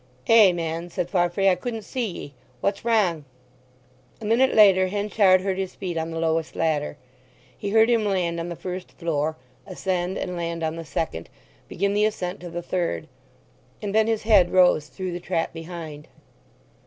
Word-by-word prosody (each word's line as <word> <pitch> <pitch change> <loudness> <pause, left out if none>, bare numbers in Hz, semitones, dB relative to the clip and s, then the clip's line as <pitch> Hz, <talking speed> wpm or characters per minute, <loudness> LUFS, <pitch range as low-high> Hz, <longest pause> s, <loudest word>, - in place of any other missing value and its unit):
"Ay, 220 -4 +7
man," 165 0 -3
said 175 0 -3
Farfrae. 175 +1 +2
"I 190 - +6
couldn't 225 +3 -4
see 250 0 -3
ye. 160 -6 -8 0.3
What's 200 +6 -1
wrang?" 205 -9 +2 1.0
A 220 - -8
minute 235 +5 +3
later 195 -3 +6
Henchard 200 -1 +3
heard 190 0 -2
his 190 -1 -4
feet 180 -3 -4
on 160 0 -2
the 165 - -5
lowest 160 -1 -1
ladder. 150 -2 -1 0.6
He 205 - -4
heard 220 +2 +5
him 230 -3 +2
land 180 -4 0
on 170 +1 -4
the 170 - -5
first 180 +1 -7
floor, 155 -2 -2 0.3
ascend 185 0 -2
and 180 -1 -4
land 170 -1 -3
on 160 0 -1
the 165 0 -7
second, 120 - -4 0.4
begin 200 +2 -1
the 210 +1 +3
ascent 190 -3 -3
to 175 - -8
the 175 +1 -5
third. 170 - -2 0.7
And 205 -2 -4
then 220 0 +3
his 225 -2 0
head 205 -5 +5
rose 180 -5 +4
through 185 +1 -5
the 175 - -4
trap 170 -2 -2
behind. 165 -3 -8
180 Hz, 180 wpm, -24 LUFS, 165-200 Hz, 1.0 s, Ay